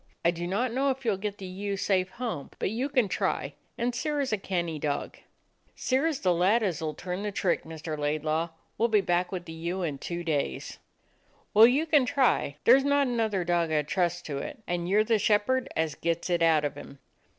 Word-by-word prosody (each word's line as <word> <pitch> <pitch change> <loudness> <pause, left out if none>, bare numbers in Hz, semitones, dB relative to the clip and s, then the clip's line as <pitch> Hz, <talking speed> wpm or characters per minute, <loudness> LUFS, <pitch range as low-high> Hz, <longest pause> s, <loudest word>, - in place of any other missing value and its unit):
I 170 - +5
do 175 0 -4
not 230 +6 0
know 275 +2 +1
if 265 -1 -3
you 225 - +3
'll - - -3
get 205 +1 -4
the 195 - -8
ewe 195 +2 -4
safe 190 -1 +1
home, 235 - -5
but - - -1
you 250 +6 -1
can 255 -6 +2
try, - - -1 0.2
and 245 +1 0
Sirrah's 285 0 -1
a - - +2
canny 175 -5 -2
dog." 145 -1 -3 0.6
"Sirrah 270 +6 +1
's 290 - -5
the 180 -2 +3
lad 195 +7 +3
as 180 -6 -1
'll 155 -1 -2
turn 180 +1 -4
the 210 0 -2
trick, 190 -2 0
Mr. 160 -1 -5
Laidlaw. 155 +2 -1 0.3
We - - +1
'll - - +1
be 215 -2 +4
back 175 -1 0
with 180 -2 -4
the 160 - -8
ewe 170 +3 -3
in 145 -5 -3
two 175 +3 -4
days." 145 - -2 0.7
"Well, 220 +2 +9
you 275 +6 +2
can 295 -5 +3
try. 250 - +2
There 250 +3 +7
's - - -3
not 285 0 +3
another 225 -6 0
dog 170 -1 +1
I 150 -1 +2
'd - - -20
trust 175 -1 0
to 140 -2 -3
it, 220 - -7
and 175 0 -2
you 200 - +3
're 215 - +5
the 220 0 +2
shepherd 225 +6 +2
as 160 -1 0
gets 170 +3 -2
it 170 -1 +1
out 160 -2 +4
of 145 - -2
him." 140 - -11
185 Hz, 230 wpm, -28 LUFS, 165-235 Hz, 0.7 s, Well